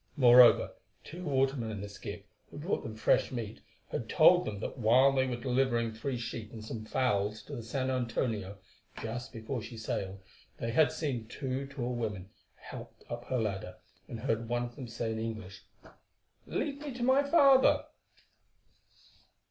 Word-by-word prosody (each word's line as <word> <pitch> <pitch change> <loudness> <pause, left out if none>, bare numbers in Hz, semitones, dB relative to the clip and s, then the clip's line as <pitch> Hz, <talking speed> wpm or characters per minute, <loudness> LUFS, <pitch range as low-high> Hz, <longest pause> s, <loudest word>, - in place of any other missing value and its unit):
Moreover, 125 -2 +7 0.3
two 175 +4 -8
watermen 135 -4 +1
in 105 -2 -5
a - - -5
skiff, 100 0 -8 0.3
who - - -11
brought 160 +6 -1
them 110 - -7
fresh 110 - +2
meat, 115 -4 -5 0.3
had - - -3
told - - +6
them 105 -2 -4
that 110 - -5
while 125 +5 +5
they 130 -1 +2
were 125 - -1
delivering 120 -2 0
three 125 +3 -3
sheep 115 -2 -6
and 110 -2 -9
some 110 0 -6
fowls 105 -4 0
to - - -8
the - - -5
San 130 +3 -2
Antonio, 115 -5 -2 0.5
just 115 +2 -5
before 115 +1 -4
she 115 +1 -9
sailed, 100 -3 -3 0.4
they 115 - -3
had 155 +6 +4
seen 140 -8 -3
two 135 +2 -4
tall 125 -3 -3
women 105 -5 -4 0.2
helped - - -11
up 120 0 -5
her 130 - -1
ladder, 105 -4 -2 0.3
and 115 - -7
heard 115 +1 -1
one 120 0 0
of 120 0 -7
them 130 -4 -7
say 115 0 -3
in 110 - -3
English, 110 -4 -6 0.8
"Lead 280 -1 -2
me 295 -1 -5
to 245 - -3
my 260 +3 +5
father." 280 -3 +5
120 Hz, 170 wpm, -31 LUFS, 110-135 Hz, 0.8 s, Moreover